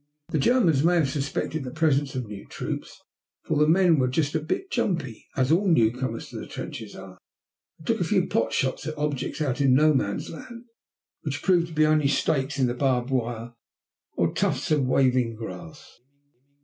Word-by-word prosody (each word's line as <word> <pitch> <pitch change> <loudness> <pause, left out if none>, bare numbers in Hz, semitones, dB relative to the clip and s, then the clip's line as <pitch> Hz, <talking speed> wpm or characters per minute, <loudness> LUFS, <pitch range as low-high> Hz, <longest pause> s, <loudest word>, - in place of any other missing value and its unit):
The 155 - 0
Germans 170 - +3
may 175 +2 +4
have 150 -6 +2
suspected 145 +1 -2
the 130 - -5
presence 145 -2 +1
of 125 -2 -2
new 105 -1 -9
troops, - - -6 0.4
for 160 - -1
the 150 +1 +4
men 170 -1 +4
were 130 - +2
just 145 +3 0
a 160 - +1
bit 160 - -3
jumpy, 165 - -2
as 130 +2 +2
all 190 +5 +3
newcomers 120 -5 +1
to - - -7
the - - -8
trenches 110 -2 -7
are, 95 -1 -11 0.6
and - - -11
a - - +1
few - - +2
took - - -5
pot - - +1
shots 130 +3 -1
at 155 0 -5
objects 150 +1 -2
out 140 -2 0
in 135 -2 +5
No 155 +2 +5
Man's 100 -7 -1
Land 235 +8 -10 0.6
which 145 -2 -4
proved 175 -3 +3
to 165 - -11
be 155 0 +4
only 155 -2 +3
stakes 140 0 0
in 130 - +3
the 120 - 0
barbed 125 -1 0
wire 120 -2 -2 0.6
or - - +1
tufts - - -1
of 145 -4 +2
waving 125 -3 +2
grass. 150 +7 -10
140 Hz, 190 wpm, -25 LUFS, 125-160 Hz, 0.6 s, in